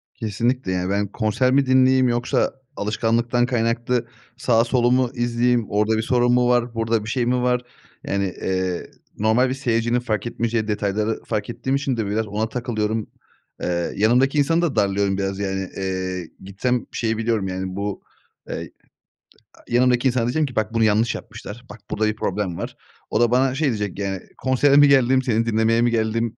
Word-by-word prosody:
Kesinlikle. 115 0 -1
Yani, 90 0 -1
ben 100 +1 0
konser 110 +5 0
mi 140 0 +4
dinleyeyim 130 0 +4
yoksa 120 +1 0 0.2
alışkanlıktan 115 +3 +1
kaynaklı 120 0 0 0.3
sağı 115 -2 +2
solu 120 0 +2
mu 125 -1 +3
izleyeyim? 120 0 +1
Orada 105 +2 +1
bir - - +1
sorun 120 +1 +2
mu 125 0 +3
var? 120 -1 +1
Burada 115 -1 0
bir 110 - -6
şey 125 0 0
mi 125 +1 +1
var? 125 0 +1 0.4
Yani, 100 -1 -1
eee, 95 -1 -2 0.3
normal 110 +5 +3
bir - - -1
seyircinin 120 -2 0
fark 115 -2 -2
etmeyeceği 115 -2 -1
detayları 105 +1 -1
fark 105 - -3
ettiğim 120 +3 -2
için 140 -3 -1
de 110 - -1
biraz 110 +2 -1
ona 110 +2 -2
takılıyorum. 110 -3 -2 0.5
Eee, 85 -1 -1
yanımdaki 125 +7 +3
insanı 165 +4 +3
da 170 -5 0
darlıyorum 100 -1 +1
biraz. 95 0 -2
Yani, 95 -2 -2
eee, 95 -2 -3
gitsem 115 +6 -1
şeyi 115 -1 -1
biliyorum, 110 -3 0
yani, 95 0 -4
bu, 100 0 -3 0.5
eee, - - -5 0.8
a - - -21
yanımdaki 125 +1 +3
insana 125 -2 +1
diyeceğim 150 +6 +1
ki 130 - -8
"Bak, 110 +1 -1
bunu 115 -1 +2
yanlış 110 +2 +2
yapmışlar. 115 +1 -9
Bak, 100 +3 -10
burada 110 - 0
bir 110 - -1
problem 95 -4 -2
var." - - -5 0.3
O - - 0
da 120 - +3
bana 130 +1 +2
şey 150 +2 +1
diyecek 105 -5 -2
yani 95 -1 -2 0.2
"Konsere 130 +2 +3
mi 145 0 +8
geldim, 130 -1 +4
seni 115 -2 0
dinlemeye 115 +1 +2
mi 120 0 +2
geldim?" 115 0 -1
115 Hz, 180 wpm, -22 LUFS, 105-125 Hz, 0.8 s, mi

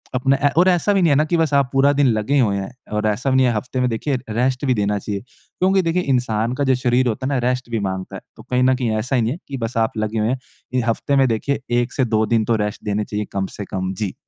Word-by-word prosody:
अपना 135 +2 +2
ए - - +6
और 180 +2 +5
ऐसा 180 +3 +2
भी 195 - +2
नहीं 170 - +4
है - - +4
ना 150 - +4
कि 170 +2 0
बस 160 -3 +1
आप 140 -2 +3
पूरा 135 +1 +4
दिन 145 -1 +3
लगे 115 +4 +1
हुए 105 -6 +2
हैं। 95 +2 -5 0.2
और 105 0 0
ऐसा 105 +6 0
भी - - +2
नहीं 130 - +4
है 120 - +1
हफ़्ते 125 +4 -3
में 125 - +2
देखिए 125 +5 -1
रेस्ट 125 +4 0
भी 130 - +3
देना 105 -2 0
चाहिए। 100 0 -4
क्योंकि 185 - -1
देखिए 170 +1 0
इंसान 120 -4 0
का 140 - -1
जो 130 -1 +3
शरीर 125 0 +1
होता 125 +3 -2
है 140 - -1
ना - - +1
रेस्ट 125 -1 -3
भी 115 - 0
माँगता 95 0 -5
है। - - -7 0.2
तो - - -12
कहीं 125 0 0
न 130 0 +4
कहीं 125 -3 -1
ऐसा 125 +5 -1
ही - - +2
नहीं 110 - 0
है 150 - -4
कि 135 - -5
बस 115 0 -4
आप 110 -1 0
लगे 110 +1 -1
हुए 110 +1 +1
हैं। 130 +1 -1 0.3
इ 130 - +2
हफ़्ते 120 +5 0
में 135 -1 +4
देखिए 120 +5 -1 0.2
1 120 +1 -4
से 130 - +1
2 110 -2 +1
दिन 110 0 +1
तो 115 - +2
रेस्ट 105 - -6
देने 105 0 -1
चाहिए 105 0 -3
कम 95 -1 -1
से 100 - -5
कम। 95 0 -3
जी। 105 -4 -2
125 Hz, 300 wpm, -20 LUFS, 110-135 Hz, 0.3 s, ए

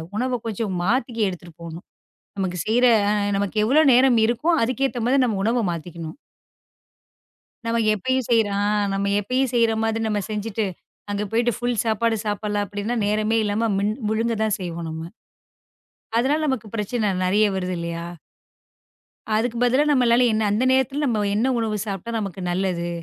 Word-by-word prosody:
உணவ 250 +2 -1
கொஞ்சம் 215 -3 -3
மாத்திக்க 235 +3 0
எடுத்துட்டு 175 -2 -7
போகணும். 170 +1 -8 0.5
நமக்குச் 180 -3 -2
செய்ற 245 +3 +3 0.2
அ, - - +3 0.2
நமக்கு 200 +1 -2
எவ்வளவு 280 +5 +5
நேரம் 250 -1 +5
இருக்கோ 245 +9 0
அதுக்கேத்த 255 +1 -1
மாதிரி 260 +2 +3
நம்ம 220 -5 0
உணவ 235 +3 +2
மாத்திக்கணும். 165 -1 -6 1.5
நாம 230 0 0
எப்பயும் 260 +4 -1
செய்ற 225 -3 +4 0.2
ஆ - - +1 0.3
நாம 200 0 0
எப்பயும் 255 +5 0
செய்ற 230 -2 +3
மாதிரி 225 0 0
நாம 210 -1 0
செஞ்சுட்டு 215 0 -2 0.5
அங்க 205 +1 -1
போயிட்டு 235 +2 +2
ஃபுல் 245 -3 0
சாப்பாடு 225 +1 +1
சாப்பிடலாம் 205 0 -1
அப்புடீன்னா 205 +4 -3
நேரமே 215 +2 +1
இல்லாம 215 +2 0
மின் 205 +2 0 0.2
முழுங்கதான் 220 -1 0
செய்வோம் 170 -2 -5
நம்ம. 160 0 -6 1.2
அதனால 280 +6 +2
நமக்குப் 230 -5 -3
பிரச்சன 210 -1 -1
நெறைய 205 +3 +3
வருது 185 -1 -2
இல்லையா? 170 0 -4 1.3
அதுக்கு 235 +1 0
பதிலா 255 +4 +3
நம்மளால 245 -2 +4
என்ன 220 - +1
அந்த 215 +5 +1
நேரத்துல 265 +3 +1
நம்ம 220 -6 0
என்ன 235 +5 +1
உணவு 220 -2 -1
சாப்பிட்டா 195 +3 -4
நமக்கு 195 -3 -5
நல்லது. 175 -2 -1
220 Hz, 150 wpm, -23 LUFS, 200-240 Hz, 1.5 s, எவ்வளவு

